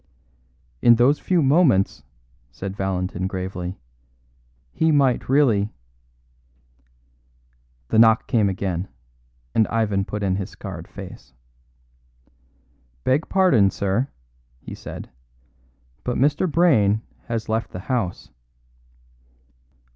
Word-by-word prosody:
"In 120 - +7
those 125 +5 +3
few 175 -4 +1
moments," 135 - +3 0.5
said 95 +9 -6
Valentin 95 -2 -2
gravely, 95 -1 -5 0.9
"he 160 0 +1
might 135 -5 +2
really 115 -7 +2 1.0
" - - -39
The 110 - +3
knock 115 -1 +5
came 105 -4 +2
again, 95 -1 -3 0.7
and 110 - +3
Ivan 105 -3 0
put 105 0 -4
in 95 -1 +1
his 100 0 -4
scarred 85 -5 -8
face. 90 -8 -11 1.7
"Beg 140 +5 +1
pardon, 180 - +4
sir," 100 +7 -1 0.5
he - - -9
said, - - -9 0.9
"but 125 - -2
Mr. 150 +6 +1
Brayne 115 - +3 0.2
has 115 -2 -3
left 110 +1 -1
the 90 - -7
house." 110 -6 -3
100 Hz, 100 wpm, -22 LUFS, 90-125 Hz, 1.7 s, In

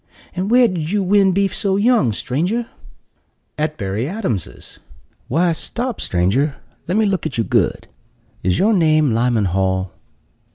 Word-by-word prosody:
"And 185 +2 -2
where 245 +1 +5
did 165 -6 -3
you 205 -1 +1
win 195 0 +4
beef 195 +1 0
so 195 -1 0
young, 210 - +3
stranger?" 175 - -2 0.9
"At 155 0 -2
Berry 105 +6 -3
Adams's." 150 - -5 0.5
"Why, 170 +6 +2
stop, 240 +8 -3
stranger, 110 - 0 0.3
let 180 +5 0
me 220 - +3
look 190 -5 0
at - - -6
you 115 - +2
good! - - 0 0.5
Is 90 0 +1
your 220 +3 +3
name 155 - +3
Lyman 115 -2 +1
Hall?" 95 0 -1
160 Hz, 150 wpm, -19 LUFS, -, 0.9 s, where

